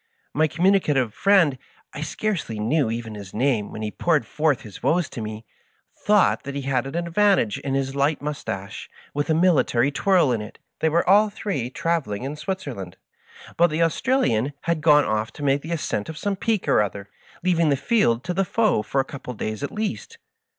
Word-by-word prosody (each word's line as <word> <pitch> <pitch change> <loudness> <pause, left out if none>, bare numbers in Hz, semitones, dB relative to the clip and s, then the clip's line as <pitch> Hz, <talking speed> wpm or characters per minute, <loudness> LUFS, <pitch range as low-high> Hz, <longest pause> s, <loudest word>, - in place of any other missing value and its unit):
My 155 +2 +3
communicative 155 - +2
friend 185 -10 +3 0.2
— - - -24
^I 145 - -4
scarcely 160 - -3
knew 120 +4 +1
even 115 -1 -4
his 100 -3 -9
name 120 -3 +1
when 110 - -6
he 105 - -3
poured 155 -4 +1
forth 150 +2 0
his 105 -3 -11
woes 170 -2 +2
to 115 - -7
mie 110 0 -6 0.3
— - - -43
thought 210 -1 +4
that 140 0 -7
he 140 - -3
had 135 -1 0
an 135 - -7
advantage 170 - +2
in 135 -1 -2
his 135 -1 -1
light 140 +2 +1
mustache, 120 -10 -5 0.2
with 145 +2 -2
a 160 - +3
military 150 -7 +3
twirl 175 -1 +3
in 115 -3 0
it. 105 - -9 0.2
They 160 - +2
were 170 +2 +1
all 205 +3 +5
three 195 - -3
travel 165 -5 -1
ing 100 - -5
in 140 +3 -4
Switzerland, 145 - -5 0.6
but 175 +1 +5
the 155 +2 +1
Australian 165 - +1
had 170 -2 -1
gone 150 -1 +5
off 110 +1 -1
to 145 - -8
make 140 0 +2
the 160 - -7
ascent 150 -9 -2
of 160 - -7
some 200 +4 -1
peak 215 +1 -1
or - - +4
other, 100 -1 -4 0.4
leaving 170 -3 +2
the 140 - +2
field 130 - +2
to 180 - -2
the 195 +2 +1
foe 215 - +1
for 135 - -2
a - - -6
couple 140 -3 -9
of - - -15
days 110 +3 -4
at 145 - -2
least. 210 - -4
145 Hz, 205 wpm, -23 LUFS, 120-170 Hz, 0.6 s, all